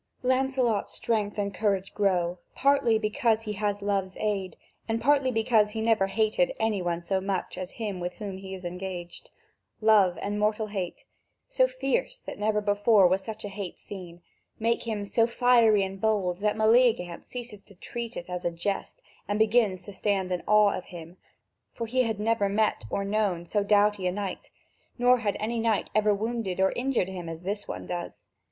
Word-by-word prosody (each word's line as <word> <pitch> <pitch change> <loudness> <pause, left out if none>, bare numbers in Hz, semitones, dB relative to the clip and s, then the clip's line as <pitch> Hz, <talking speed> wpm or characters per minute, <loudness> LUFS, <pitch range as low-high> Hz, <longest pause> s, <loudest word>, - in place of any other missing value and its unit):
Lancelot's 255 -4 +1
strength 215 -3 -1
and 200 -1 -1
courage 195 -1 -1
grow, 180 -3 +1 0.2
partly 275 -5 +3
because 220 +1 +1
he 210 -1 -3
has 205 0 -2
love's 195 -2 -1
aid, 195 -5 -2 0.3
and 225 0 0
partly 280 0 +3
because 225 -2 +3
he 225 - -3
never 220 -4 +3
hated 215 -3 +1
any 220 -3 +1
one 175 -1 -2
so 190 +2 -1
much 190 -1 -3
as 185 0 -6
him 210 -5 -4
with 175 0 -3
whom 195 -3 -6
he 190 0 -7
is 185 -1 -10
engaged. 180 -1 -6 0.5
Love 205 -5 +4
and 205 +1 -3
mortal 210 +1 +1
hate, 195 -4 -5 0.4
so - - +3
fierce - - -1
that - - -9
never 210 0 +1
before 205 -1 +4
was 190 +2 +1
such 220 0 -7
hate 200 -3 -6
seen, 175 -3 -10 0.3
make 230 +1 0
him 210 -3 -2
so 230 +3 +2
fiery 235 -4 +4
and 190 0 -5
bold 200 -5 +1
that 210 +2 0
Meleagant 220 -6 +3
ceases 240 -5 -7
to 200 - -19
treat 235 +5 -6
it 175 - -5
as 180 -1 -5
a - - +1
jest 170 +4 -4 0.2
and 205 +1 0
begins 215 -4 +2
to 205 - -9
stand 195 -2 -1
in 180 - -1
awe 210 -1 +5
of - - -6
him, 170 0 -10 0.6
for 230 - -3
he 255 +3 +1
had 225 -4 -1
never 215 -2 +1
met 210 - +1
or 200 - -2
known 200 -4 0
so 205 +4 0
doughty 205 -2 +3
a - - +1
knight, 195 0 -5 0.5
nor 245 0 +4
had 210 -4 -1
any 230 +2 -2
knight 225 -2 0
ever 215 0 +3
wounded 210 -2 -2
or 190 0 +4
injured 250 -7 0
him 180 -3 -6
as 165 +1 -7
this 205 +2 -3
one - - -6
does. 175 -1 -6
205 Hz, 185 wpm, -27 LUFS, 190-225 Hz, 0.6 s, awe